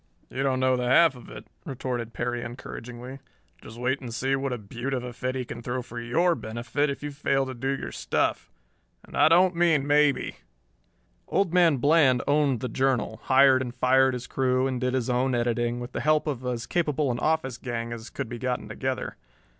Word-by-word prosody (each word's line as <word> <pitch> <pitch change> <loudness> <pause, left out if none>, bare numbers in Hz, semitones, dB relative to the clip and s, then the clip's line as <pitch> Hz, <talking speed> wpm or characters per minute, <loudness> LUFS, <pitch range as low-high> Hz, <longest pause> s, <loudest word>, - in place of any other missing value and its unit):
"You 130 - -3
don't 135 -1 +1
know 130 0 +3
the 125 -1 -1
half 155 +3 +5
of 125 - -13
it," - - -10 0.2
retorted 125 -4 -4
Perry 120 +1 -3
encouragingly. 120 +2 -8 0.4
"Just 115 - -11
wait 130 +3 -1
and 125 -3 -7
see 130 +4 0
what 135 0 -2
a 125 - -2
beaut 120 +5 -4
of 125 - -3
a 125 -1 -6
fit 130 +2 -3
he 130 -1 -3
can - - -7
throw 125 +1 -3
for 120 +1 -8
your 165 +10 +2
benefit 120 +4 -2
if 140 - -5
you 145 - -4
fail 140 -1 0
to 130 - -5
do 130 +2 -4
your 135 - -3
stuff - - -1 0.6
and - - -12
I - - +6
don't 180 +2 +5
mean 165 -5 +3
maybe." 145 -1 +2 0.9
Old 190 -4 +1
Man 170 -5 +5
Bland 140 -2 +4
owned 145 -5 +2
the 125 - -2
Journal, 125 -3 0
hired 130 0 +5
and 125 -1 -5
fired 130 +1 +3
his 125 0 -6
crew 130 0 +1
and 130 -2 -2
did 125 0 0
his 125 -3 -1
own 125 +1 +1
editing, 120 0 0
with 120 +1 -7
the - - -3
help 155 0 +2
of 135 -5 -3
as 120 -2 -2
capable 150 -5 0
an 120 - -3
office 145 -5 0
gang 115 -1 -4
as 115 0 -8
could - - -5
be 120 +1 -7
gotten 125 0 -2
together. 130 -1 -4
130 Hz, 210 wpm, -26 LUFS, 120-140 Hz, 0.9 s, I